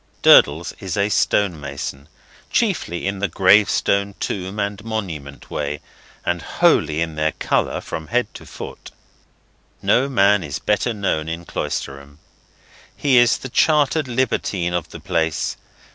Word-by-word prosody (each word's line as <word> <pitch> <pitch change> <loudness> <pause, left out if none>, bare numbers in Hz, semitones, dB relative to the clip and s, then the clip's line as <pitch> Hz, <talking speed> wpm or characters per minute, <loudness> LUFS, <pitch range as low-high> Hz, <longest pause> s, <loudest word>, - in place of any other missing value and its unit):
Durdles 80 +4 +6
is 95 -2 -4
a 100 +1 +2
stonemason; 75 -9 -1 0.4
chiefly 85 0 0
in 100 0 -2
the 100 - 0
gravestone, 100 0 +3
tomb, 95 +1 -4
and 100 0 -3
monument 85 -11 -6
way, 75 0 -3 0.5
and 85 -1 0
wholly 75 +2 +2
of 80 -1 -5
their 75 0 0
colour - - 0
from 80 -1 -6
head 125 +1 +1
to - - -11
foot. - - -9 0.9
No 135 +3 +2
man 100 -5 +3
is 70 -2 -4
better 105 +3 0
known 80 -6 -1
in 85 +1 -5
Cloisterham. 70 -1 -5 0.8
He 135 -3 +3
is 120 -1 +5
the 130 - -8
chartered 150 +1 +2
libertine 110 -8 -1
of 85 -2 -2
the - - -9
place. 80 -1 -1
95 Hz, 135 wpm, -21 LUFS, 80-105 Hz, 0.9 s, Durdles